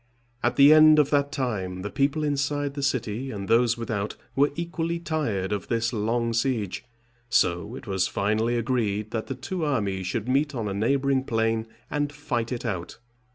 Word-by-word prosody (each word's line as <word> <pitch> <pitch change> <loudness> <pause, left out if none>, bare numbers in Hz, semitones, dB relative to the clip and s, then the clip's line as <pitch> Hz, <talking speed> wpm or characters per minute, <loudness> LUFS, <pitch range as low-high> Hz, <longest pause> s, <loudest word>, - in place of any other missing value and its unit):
At - - +1
the 140 +2 +8
end 155 0 +8
of 150 -2 +3
that 145 -1 +2
time 100 -10 -3
the 105 - -4
people 140 +3 +1
inside 145 0 -1
the 140 - -4
city, 125 -2 -1
and 100 -5 -5
those 115 +2 +3
without, 110 -3 -3 0.2
were 145 +2 +3
equally 170 0 -2
tired 150 - -2
of 105 -1 -2
this 115 0 0
long 115 +2 0
siege: 115 -5 -1 0.5
so 90 +2 +1
it 135 0 -9
was 95 -3 0
finally 110 +4 0
agreed 110 -3 -1
that 110 -2 -3
the 135 - -4
two 160 +7 -4
armies 100 -10 -1
should 110 +4 -2
meet 140 +2 +1
on 115 -3 -2
a 100 - -2
neighboring 135 +5 +1
plain 115 -2 0 0.2
and 145 -1 -1
fight 125 -5 -3
it 125 - -4
out. 90 -3 -4
120 Hz, 180 wpm, -26 LUFS, 105-140 Hz, 0.5 s, the